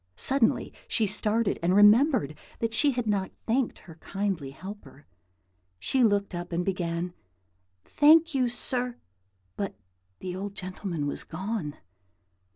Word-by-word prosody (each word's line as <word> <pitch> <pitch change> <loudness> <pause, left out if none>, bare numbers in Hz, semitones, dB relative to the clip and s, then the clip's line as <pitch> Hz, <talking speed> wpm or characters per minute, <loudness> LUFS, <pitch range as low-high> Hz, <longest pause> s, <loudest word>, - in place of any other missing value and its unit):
Suddenly 265 - +2
she 225 - +2
started, 210 +1 0
and 175 +2 +2
remembered 210 - +5 0.2
that 230 -1 -2
she 285 +3 +3
had 245 -1 -2
not 200 -3 0
thanked 240 +2 0
her 165 -3 -14
kindly 195 -8 -2
helper. 145 -2 -11 0.7
She 250 - +1
looked 205 -3 +2
up, 175 0 -5
and 175 +1 -1
began, 175 -2 -2 0.7
"Thank 320 +2 +5
you, 255 -3 +2
sir;" 245 0 -1 0.6
but 200 - -3 0.4
the 180 -1 -5
old 200 +1 -5
gentleman 185 -4 -4
was 145 - -2
gone. 185 -3 -4
200 Hz, 130 wpm, -27 LUFS, 175-235 Hz, 0.7 s, remembered